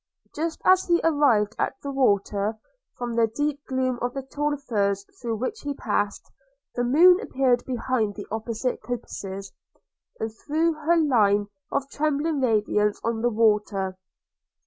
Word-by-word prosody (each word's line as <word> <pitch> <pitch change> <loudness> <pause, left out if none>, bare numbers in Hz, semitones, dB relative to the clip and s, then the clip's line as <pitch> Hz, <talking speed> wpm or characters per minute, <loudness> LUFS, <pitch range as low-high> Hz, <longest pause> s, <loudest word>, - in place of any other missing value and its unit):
Just 320 +2 -3
as 370 0 +5
he 345 -1 +4
arrived 265 -10 +3
at - - 0
the 280 - -3
water, 210 -4 +1 0.4
from 240 -1 -3
the 230 -1 +3
deep 290 +5 -2
gloom 260 -2 -1
of 245 +1 -2
the 270 - -3
tall 290 +2 -2
firs 200 -7 -1 0.2
through 235 -2 -2
which 255 - -3
he 285 -1 -4
passed, 205 -4 -2 0.4
the 245 - -1
moon 345 +9 +6
appeared 260 - +1
behind 245 -4 -1
the 205 - -7
opposite 225 +3 -2
coppices, 195 -5 -6 0.7
and 220 0 -2
threw 320 +7 0
her 310 +2 +1
long 320 -2 +3
line 205 -5 +3 0.2
of 280 -1 -1
trembling 305 +1 0
radiance 210 -3 +1
on 230 -1 -1
the 240 - +2
water. 210 -4 +1
245 Hz, 150 wpm, -25 LUFS, 215-290 Hz, 0.7 s, moon